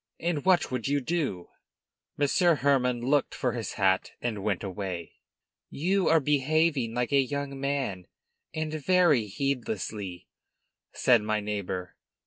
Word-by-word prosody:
And 170 -4 -1
what 185 -6 +3
would 125 -2 -2
you 145 +1 +2
do?" 135 - -2 0.7
Monsieur 160 +4 +3
Hermann 130 -4 +2
looked 135 +3 +1
for 125 - 0
his 115 -2 -4
hat 95 -2 +1
and 110 -4 -3
went 100 -3 -1
away. 95 -3 -5 0.5
"You 185 +5 0
are 165 0 +5
behaving 145 -3 +1
like 125 +2 -1
a 140 -1 +5
young 140 0 -4
man, 135 -10 -2 0.4
and 155 -1 -3
very 155 -6 +3
heedlessly," 105 -6 -3 0.6
said 120 -3 +4
my 110 0 0
neighbor. 100 -3 -4
130 Hz, 130 wpm, -28 LUFS, 105-145 Hz, 0.7 s, are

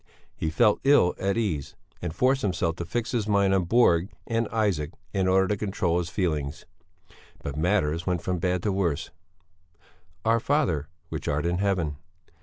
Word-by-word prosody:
He 80 - -2
felt 105 +7 +3
ill 135 -10 +5
at 100 +2 0
ease, 85 -12 -2 0.3
and 85 - -3
forced 130 - +2
himself 85 -6 0
to 85 - -4
fix 120 +6 -2
his 115 -4 -1
mind 100 -2 +3
on 95 -2 +2
Borg 90 -4 +4 0.2
and 115 -1 0
Isaac 100 -9 0 0.2
in 95 -2 +1
order 95 +1 +4
to 105 - +2
control 95 -4 0
his 85 -2 -3
feelings. 75 -7 -2 0.8
But 70 - -4
matters 85 -1 0
went 90 -3 0
from 90 -1 -1
bad 90 0 0
to 105 - +1
worse: 90 -6 -1 1.1
"Our 115 +1 +4
Father, 120 - +1 0.2
which - - -5
art 75 +2 0
in 90 +1 0
Heaven...." 90 -7 0
95 Hz, 170 wpm, -26 LUFS, 85-105 Hz, 1.1 s, ill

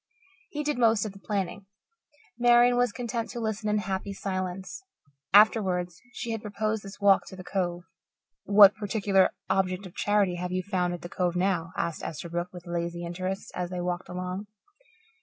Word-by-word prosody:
He 300 0 -3
did 295 -3 -1
most 225 -3 +4
of 215 - -4
the 195 - -14
planning. 195 -1 -3 0.7
Marian 240 0 +6
was 245 -2 +2
content 235 0 -3
to 240 - -5
listen 220 -1 -2
in 210 - +2
happy 195 0 -3
silence. 185 - -4 0.5
Afterwards 185 -4 +4
she 235 - -5
had 225 -1 -3
proposed 215 +1 -2
this 195 0 -10
walk 200 -1 +4
to - - -9
the 185 - -9
Cove. 175 -2 -2 0.6
"What 200 0 +8
particular 205 -2 +2 0.2
object 190 0 0
of 180 - -10
charity 205 -4 +1
have 180 0 -4
you 185 0 -1
found 180 -2 -1
at 175 - -11
the - - -5
Cove 180 -1 -1
now?" 180 -2 0
asked 170 - -2
Esterbrook, 170 +2 -4
with 180 -1 -11
lazy 170 0 -3
interest, 185 +3 -4
as 180 -1 -3
they 180 0 -4
walked 175 0 -3
along. 180 +3 -4
195 Hz, 175 wpm, -28 LUFS, 180-210 Hz, 0.7 s, What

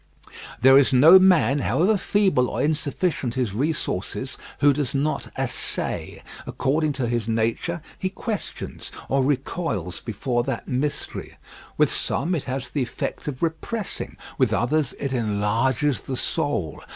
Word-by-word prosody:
There 135 +2 +8
is 140 - +3
no 155 +9 +8
man, 165 - +4
however 185 +9 +2
feeble 190 -10 +2
or - - -3
insufficient 150 -3 -1
his 125 -6 -1
resources, 130 - -2 0.2
who 145 0 +5
does 140 -1 -2
not 150 +3 -1
essay. - - -2 0.2
According 150 +2 0
to 130 -3 -2
his 120 -2 -1
nature 115 +9 -1 0.2
he 185 - -1
questions 210 +2 -5 0.2
or 135 0 +2
recoils 130 - -2
before 120 +2 -1
that 135 -3 -3
mystery. 135 +3 -3 0.4
With - - +4
some 165 +7 -1
it 160 - -2
has 130 -1 -4
the 145 - -1
effect 125 +3 -4
of 140 -1 -4
repressing; 170 +6 -3 0.2
with - - +3
others 140 +3 +1
it 140 -1 -3
enlarges 115 +5 +1
the 130 - -4
soul. 95 - -1
135 Hz, 140 wpm, -24 LUFS, 120-155 Hz, 0.4 s, There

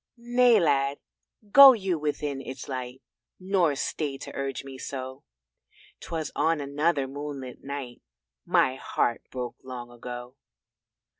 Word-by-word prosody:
"Nay, 240 -1 +4
Lad, 140 -4 +2 0.5
go 275 +1 +11
you 190 -7 -1
within 145 -2 -2
its 135 - -8
light, 130 -1 -6 0.4
Nor 185 -5 +2
stay 140 0 -3
to - - -9
urge 135 0 -3
me 135 -1 -10
so 130 0 -6 0.8
'Twas 160 -2 -4
on 160 +1 +2
another 145 0 0
moonlit 140 -2 -7
night 135 -3 -6 0.4
My 130 0 +2
heart 120 -2 -1
broke 125 -2 -5
long 125 -2 -8
ago." 125 +2 -8
140 Hz, 125 wpm, -27 LUFS, 130-160 Hz, 0.8 s, go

